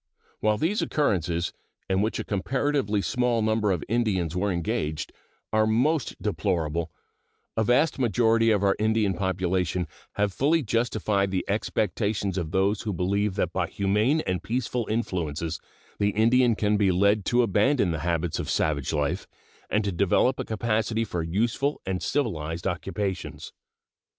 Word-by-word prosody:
While 105 0 +2
these 180 - 0
occurrences, 90 - 0 0.3
in 95 0 +1
which 110 +2 0
a - - -3
comparatively 110 0 0
small 120 -2 +1
number 110 -1 +1
of 90 -4 -1
Indians 95 -7 0
were 100 +2 0
engaged, 80 -3 -2 0.4
are 110 0 +3
most 130 +6 +1
deplorable, 85 -5 -1 0.6
a 110 - +2
vast 135 +7 +2
majority 115 -2 +3
of 105 -2 +2
our 100 -1 +3
Indian 110 -2 +2
population 90 -1 -1 0.3
have 100 -1 0
fully 155 - +2
justified 110 -4 0
the 95 -1 -1
expectations 100 -1 -1
of 80 -3 -3
those 95 +4 +1
who 110 - -3
believe 100 +3 0
that 90 -4 -1
by 95 -2 0
humane 105 - +1
and 90 - -2
peaceful 120 -1 -2
influences 85 -7 -2 0.4
the 100 - +3
Indian 115 +3 +3
can 105 0 +1
be 100 -2 +3
led 100 +3 +3
to 120 0 +3
abandon 105 0 +2
the 80 - -2
habits 85 -1 -1
of - - -4
savage 70 -4 0
life 75 +5 -1 0.4
and 105 - +1
to 100 - -1
develop 100 +8 +2
a - - 0
capacity 110 0 0
for 90 -5 -3
useful 115 - 0
and 95 -1 -2
civilized 85 - -2
occupations. 95 +1 -3
100 Hz, 150 wpm, -26 LUFS, 90-115 Hz, 0.6 s, are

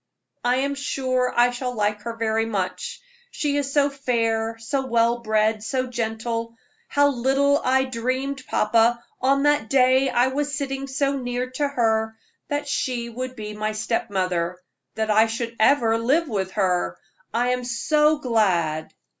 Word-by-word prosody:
"I 245 +1 +2
am 275 +2 0
sure 255 -2 -1
I 245 +1 +5
shall 250 0 -4
like 210 -1 0
her 230 +2 -5
very 225 0 0
much; 190 -4 -3 0.3
she 295 -11 -1
is 280 -1 -1
so 285 0 +3
fair, 230 -4 -1
so 260 +4 -2
well 235 0 +2
bred, 215 -1 +1
so 255 +2 -1
gentle. 230 -1 -3 0.3
How 285 0 +3
little 275 +2 +2
I 265 +1 +3
dreamed, 260 +2 -2
papa, 230 +2 +2 0.2
on 275 +2 +3
that 290 -6 +2
day 260 0 +4
I 245 +1 +3
was 290 +2 -2
sitting 275 -1 -3
so 275 +1 0
near 250 0 -3
to 285 +3 0
her, 220 -4 0 0.3
that 290 0 -2
she 245 -4 -2
would 255 +2 -5
be 210 -2 -6
my 215 +1 -2
step 225 +2 -2
mother 180 -3 -1 0.4
that 220 -1 0
I 220 +2 +5
should 230 +1 -4
ever 230 -1 +4
live 290 +8 +2
with 190 -6 -3
her. 180 - 0 0.3
I 240 +2 +1
am 250 0 -1
so 300 +6 +2
glad!" 185 - 0
240 Hz, 160 wpm, -23 LUFS, 220-270 Hz, 0.4 s, I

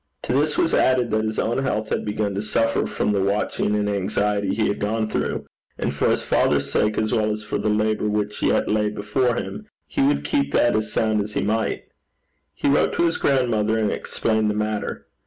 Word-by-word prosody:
To - - -1
this 150 +3 +1
was 165 - +2
added 125 -3 +3
that 110 0 +1
his 110 0 -3
own 120 +3 0
health 110 -5 -1
had - - -1
begun 105 -1 -1
to 100 - -2
suffer 115 +2 +1
from - - -1
the 100 -1 +1
watching 105 +1 0
and 105 0 0
anxiety 100 0 0
he 110 - +1
had 100 - -2
gone 110 +2 -1
through, - - -2 0.3
and - - -2
for - - +1
his - - +1
father's - - +1
sake, 105 0 +1
as 110 0 0
well 110 -1 +2
as 105 0 -3
for 105 - -3
the 105 +1 0
labour 105 0 +1
which 105 0 -2
yet - - +2
lay 105 0 +1
before 105 +4 0
him, 215 +10 -5 0.2
he 280 - -2
would 280 +1 +2
keep 280 -2 0
that 120 - +3
as 110 0 -1
sound 110 -1 +1
as 105 +1 -5
he - - -1
might. 110 +2 -1 0.7
He - - -1
wrote 140 - +3
to 170 - +2
his 165 - 0
grandmother 115 -5 +1
and 110 -2 +1
explained 110 -1 0
the 105 - -1
matter. 105 0 -3
110 Hz, 215 wpm, -23 LUFS, 105-115 Hz, 0.7 s, added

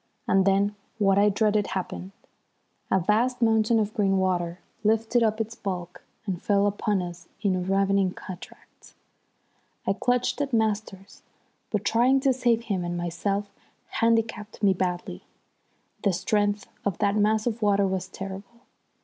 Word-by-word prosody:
And 190 -1 +3
then 200 +1 +3 0.2
what 195 -2 +3
I 205 +1 +5
dreaded 210 0 +2
happened. 185 0 -5 0.8
A 190 - +3
vast 225 +7 +1
mountain 225 -1 +3
of 215 0 -1
green 195 -2 +2
water 175 -2 0 0.3
lifted 225 +2 +2
up 220 -1 +2
its 225 0 -2
bulk 180 -5 -5 0.2
and 185 -4 -3
fell 200 -1 +2
upon 205 -1 0
us 175 0 -8 0.2
in 195 -3 +2
a - - -1
ravening 195 +1 +2
cataract. 185 -1 -12 0.9
I - - +2
clutched 245 +6 0
at 275 -2 -2
Masters, 210 -3 -1 0.5
but 210 -2 -2
trying 250 +5 +4
to 270 -1 +3
save 240 -2 +1
him 195 -6 -2
and 175 0 -3
myself 195 +4 -2 0.5
handicapped 225 -2 0
me 195 -2 +5
badly. 180 - -3 0.8
The 200 - +2
strength 205 +2 0 0.2
of 200 -4 -1
that 200 0 +1
mass 215 +1 +2
of 235 -1 -2
water 200 -1 +3
was 190 -1 -2
terrible. 195 +5 -8
205 Hz, 150 wpm, -26 LUFS, 190-220 Hz, 0.9 s, I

